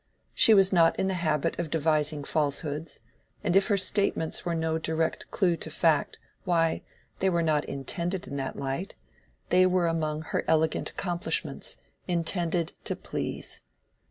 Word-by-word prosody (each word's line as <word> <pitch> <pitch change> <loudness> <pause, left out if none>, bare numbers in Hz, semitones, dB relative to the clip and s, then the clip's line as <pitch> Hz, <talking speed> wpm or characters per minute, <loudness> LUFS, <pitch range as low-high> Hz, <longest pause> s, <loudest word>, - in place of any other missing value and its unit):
She 220 - +7
was 195 -1 +5
not 165 -2 +4
in 190 - +1
the 190 - 0
habit 155 -5 0
of 170 -2 -2
devising 150 -1 +1
falsehoods, 150 +1 -2 0.4
and 180 -3 +1
if 195 - +5
her 205 -3 +2
statements 195 -4 +2
were 170 -1 -1
no 160 0 0
direct 160 0 -1
clew 180 -4 +2
to 160 - -6
fact, 160 -1 +1 0.3
why, 165 -2 +1 0.4
they 190 - +2
were 170 -2 +1
not 155 -2 +1
intended 170 +7 -3
in 140 - -6
that 135 -1 -3
light—they 180 +5 -2
were 180 -1 +2
among 155 -2 -1
her - - -2
elegant 160 0 +1
accomplishments, 170 -5 -2 0.3
intended 170 -1 -1
to - - -2
please. - - -3
165 Hz, 150 wpm, -28 LUFS, 155-180 Hz, 0.4 s, She